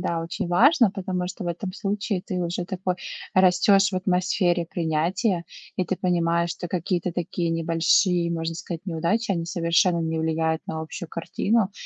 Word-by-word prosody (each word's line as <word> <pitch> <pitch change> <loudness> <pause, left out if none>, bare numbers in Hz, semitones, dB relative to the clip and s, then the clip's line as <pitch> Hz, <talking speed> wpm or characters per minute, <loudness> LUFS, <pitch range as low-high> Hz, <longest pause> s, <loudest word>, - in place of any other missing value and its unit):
да, 170 -2 -1
очень 165 +1 -4
важно, 235 - +5
потому 185 -2 -3
что 185 +2 -6
в 175 - -2
этом 185 +2 -4
случае 200 -2 -2
ты 185 - -4
уже 175 +1 -2
такой, 185 0 -2 0.4
растешь 190 +2 +5
в - - -5
атмосфере 180 -1 +1
принятия, 170 +4 0 0.3
и 185 - +1
ты 185 +2 -2
понимаешь, 170 -2 +1
что 175 - -5
какие-то 175 0 -1
такие 170 0 -2
небольшие, 165 +2 +2
можно 165 0 -2
сказать, 170 -1 -6
неудачи, 180 +7 0
они 170 -3 -2
совершенно 170 0 +2
не 160 0 -1
влияют 160 0 0
на 160 - -4
общую 160 +1 -6
картину 200 +5 0
175 Hz, 160 wpm, -24 LUFS, 165-185 Hz, 0.4 s, важно